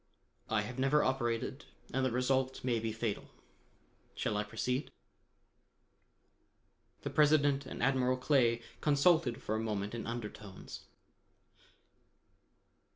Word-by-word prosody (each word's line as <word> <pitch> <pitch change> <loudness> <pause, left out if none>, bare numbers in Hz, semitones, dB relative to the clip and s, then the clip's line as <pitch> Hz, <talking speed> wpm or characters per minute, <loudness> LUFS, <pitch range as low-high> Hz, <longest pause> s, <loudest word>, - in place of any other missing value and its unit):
I 110 -1 +2
have 125 +5 -6
never 135 +3 +3
operated 120 -3 -1 0.3
and 135 +1 +1
the 130 - +2
result 130 +2 0
may 120 -3 +1
be 110 0 -2
fatal. 110 -1 -3 0.9
Shall 105 - -1
I 105 - +1
proceed?" 125 +5 -2 2.1
The - - -3
President 145 -2 +4
and - - -5
Admiral 130 -1 +2
Clay 125 -4 +2 0.2
consulted 145 -4 +3
for 110 - -2
a 110 - 0
moment 105 -2 -2
in 115 - -4
undertones. 105 -4 -7
125 Hz, 110 wpm, -33 LUFS, 115-135 Hz, 2.1 s, President